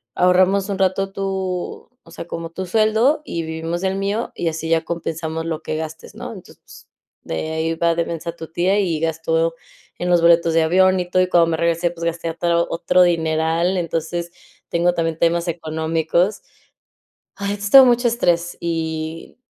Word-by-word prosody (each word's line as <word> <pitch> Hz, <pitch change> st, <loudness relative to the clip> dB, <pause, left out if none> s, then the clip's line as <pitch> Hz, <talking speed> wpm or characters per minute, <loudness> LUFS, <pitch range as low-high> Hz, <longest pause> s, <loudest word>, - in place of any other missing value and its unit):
ahorramos 185 Hz, +2 st, +3 dB
un 200 Hz, -, -2 dB
rato 195 Hz, +1 st, +1 dB
tu 190 Hz, -2 st, -4 dB
o -, -, -18 dB
sea, 170 Hz, -, -8 dB
como 165 Hz, -1 st, -5 dB
tu 185 Hz, +3 st, -5 dB
sueldo, 220 Hz, -, +2 dB
y 165 Hz, -1 st, -3 dB
vivimos 165 Hz, +2 st, -4 dB
del 190 Hz, 0 st, 0 dB
mío, 200 Hz, +4 st, -2 dB
y 170 Hz, -, -2 dB
así 160 Hz, 0 st, -5 dB
ya 165 Hz, 0 st, +2 dB
compensamos 165 Hz, -1 st, -4 dB
lo 160 Hz, -1 st, -3 dB
que -, -, -3 dB
gastes, 160 Hz, 0 st, -7 dB
¿no?" -, -, -7 dB
Entonces -, -, -15 dB, 0.4 s
de 155 Hz, -, -4 dB
ahí 160 Hz, +1 st, -1 dB
va 170 Hz, 0 st, +2 dB
de 170 Hz, 0 st, 0 dB
mensa 170 Hz, 0 st, -4 dB
tu 165 Hz, -1 st, -8 dB
tía, 185 Hz, +4 st, +1 dB
y 170 Hz, -6 st, 0 dB
gastó 165 Hz, 0 st, 0 dB, 0.5 s
en 180 Hz, -, -2 dB
los 175 Hz, -1 st, +4 dB
boletos 170 Hz, -1 st, +4 dB
de 165 Hz, -, +4 dB
avión 185 Hz, +3 st, +4 dB
y 180 Hz, -, -2 dB
todo, 185 Hz, +1 st, +3 dB
y 185 Hz, -, +2 dB
cuando 170 Hz, -2 st, +4 dB
me 160 Hz, -, 0 dB
regresé, 170 Hz, +1 st, +1 dB
pues 170 Hz, -1 st, -9 dB
gasté 170 Hz, 0 st, -2 dB
ata 170 Hz, +1 st, 0 dB
otro 170 Hz, +1 st, +2 dB
dineral, 165 Hz, +1 st, +1 dB
entonces, 170 Hz, 0 st, -3 dB, 0.4 s
tengo 175 Hz, +1 st, +2 dB
también 165 Hz, -1 st, -1 dB
temas 170 Hz, +1 st, +1 dB
económicos. 165 Hz, +3 st, -1 dB, 1.0 s
Ay, 200 Hz, 0 st, -2 dB
es 205 Hz, 0 st, -4 dB
todo 270 Hz, -1 st, +11 dB
mucho 245 Hz, -1 st, +3 dB
estrés 175 Hz, -7 st, 0 dB
y, 160 Hz, 0 st, -4 dB
170 Hz, 180 wpm, -20 LUFS, 165-185 Hz, 1.0 s, todo